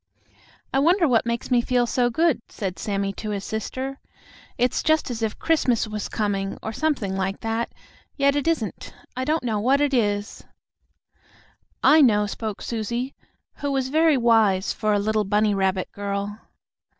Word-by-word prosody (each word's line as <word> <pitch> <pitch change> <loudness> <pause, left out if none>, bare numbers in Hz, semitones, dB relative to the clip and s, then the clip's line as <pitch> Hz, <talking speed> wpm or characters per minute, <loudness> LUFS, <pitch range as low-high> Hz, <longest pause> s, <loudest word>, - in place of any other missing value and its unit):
"I 270 - +3
wonder 340 +4 +4
what 235 -3 +2
makes 235 +2 -3
me 245 -1 +4
feel 245 0 +1
so 245 0 +1
good?" 320 +1 +2
said 190 -4 -5
Sammie 200 -1 -2
to 215 - -6
his 200 -2 -3
sister. 260 +6 -4 0.6
"It's 245 +1 +1
just 315 -4 +1
as 235 -1 -5
if 220 -2 -2
Christmas 255 -9 +1
was 215 -1 -4
coming, 200 -2 -2
or 220 - -4
something 260 -10 -1
like 195 +1 -2
that; 225 +1 -2 0.5
yet 280 0 +3
it 290 +2 -1
isn't. 270 - -2 0.2
I 255 +1 -2
don't 310 0 0
know 220 -4 -1
what 260 +6 +3
it 290 -1 +1
is." 205 -4 0 1.4
"I 310 +1 +7
know," 210 -6 +4
spoke 210 0 -5
Susie, 235 +3 -3 0.4
who 285 -1 -2
was 265 -1 0
very 315 0 +4
wise 220 -5 +3
for 215 -1 -1
a 205 - +3
little 215 +1 +1
bunny 210 +1 +2
rabbit 190 -1 0
girl. 200 0 -3
230 Hz, 165 wpm, -24 LUFS, 205-270 Hz, 1.4 s, I